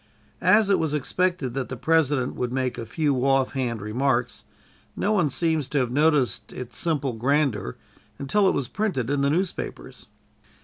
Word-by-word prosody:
As 200 +2 +4
it 195 - +3
was 155 -2 0
expected 160 -2 -1
that 135 -1 -3
the 130 - -5
President 145 -3 +1
would 125 -1 -3
make 130 -1 -2
a 115 - -6
few 145 +2 0
offhand 130 -4 0
remarks, 120 +2 -1 0.5
no 205 - 0
one 180 -8 +2
seems 160 -1 0
to 145 - -2
have 125 -3 +1
noticed 135 -6 +1
its 125 -2 -8
simple 145 -6 0
grandeur 125 - 0 0.4
until 195 +9 +2
it - - 0
was 135 - -1
printed 155 - -2
in 145 -1 +1
the 140 - +2
newspapers. 180 +4 -3
140 Hz, 165 wpm, -24 LUFS, 125-160 Hz, 0.5 s, As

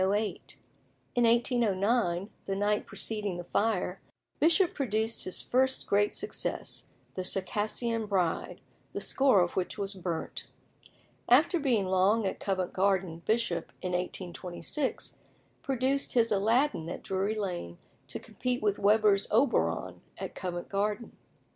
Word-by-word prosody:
In 190 - +3 1.2
1809, 225 -5 +2 0.2
the 195 - 0
night 205 +1 +1
preceding 200 -1 -3
the 175 - -5
fire, 195 -1 0 0.4
Bishop 340 +3 +4
produced 225 -3 -1
his 185 - -2
first 260 +1 +2
great 205 +1 +3
success, 420 - -4 0.3
"The 185 - -3
Circassian 215 +4 -1
Bride," 185 -5 0 0.3
the - - -2
score 265 -8 +4
of 175 - 0
which 185 - -1
was 200 0 -3
burnt. 175 -4 -4 0.8
After 305 +8 +5
being 245 -9 +2
long 190 +4 +3
at 190 - -2
Covent 185 -2 -1
Garden, 190 -3 +1
Bishop, 215 -7 0
in 180 - -1
1826, 180 - -3 0.4
produced 270 +1 0
his 230 -2 +3
"Aladdin" 215 - +2
at - - -6
Drury 195 +3 -1
Lane 175 - -4 0.3
to - - -5
compete 250 -2 -3
with 205 -1 +1
Weber's 205 -1 +4
"Oberon" 245 +6 +1 0.2
at - - -5
Covent 175 -2 -4
Garden. 210 +3 -1
205 Hz, 125 wpm, -30 LUFS, 185-235 Hz, 1.2 s, After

